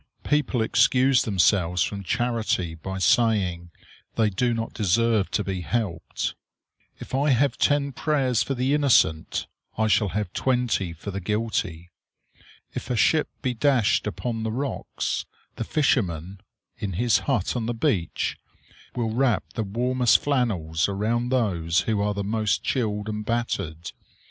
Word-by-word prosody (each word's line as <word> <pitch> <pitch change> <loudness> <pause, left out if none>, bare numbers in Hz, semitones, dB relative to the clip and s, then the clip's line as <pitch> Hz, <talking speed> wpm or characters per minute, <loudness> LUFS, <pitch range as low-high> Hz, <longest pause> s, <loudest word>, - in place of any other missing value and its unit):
People 145 -5 +1
excuse 130 +3 +4
themselves 90 -3 +2
from 100 -1 -4
charity 115 -6 -1
by 95 +4 -6
saying 95 -5 +2 0.5
they 110 -2 +2
do 120 +6 +1
not 115 -1 -3
deserve 110 0 +2
to 105 - 0
be 95 -2 -3
helped. 95 -4 -2 0.6
If - - -11
I 140 +3 +2
have 135 +2 +3
ten 145 -1 +2
prayers 135 -4 +1
for 135 - -1
the 130 +3 +1
innocent, 125 - +2 0.3
I 110 - +2
shall 105 -1 +2
have 100 +1 -3
twenty 125 -8 0
for 85 +5 -7
the 100 - -4
guilty. 105 -4 -2 0.8
If - - -6
a 125 - 0
ship 155 +6 +3
be 130 - 0
dashed 120 -4 +2
upon 115 +2 -3
the 110 0 -2
rocks, 135 +4 -3 0.3
the - - -2
fisherman, 95 - 0 0.4
in 100 -2 -3
his 115 +5 +2
hut 120 -7 0
on 115 -2 -2
the 120 - -2
beach, 90 -6 -1 0.6
will 115 -2 -1
wrap 120 0 0
the 115 - -2
warmest 125 +4 +2
flannels 100 - 0
around 115 +5 -1
those 90 -10 +1
who 110 -2 0
are 105 0 0
the 100 - -2
most 105 -2 0
chilled 105 -5 -1
and 105 0 -3
battered. 100 -8 -3
110 Hz, 145 wpm, -25 LUFS, 95-125 Hz, 0.8 s, excuse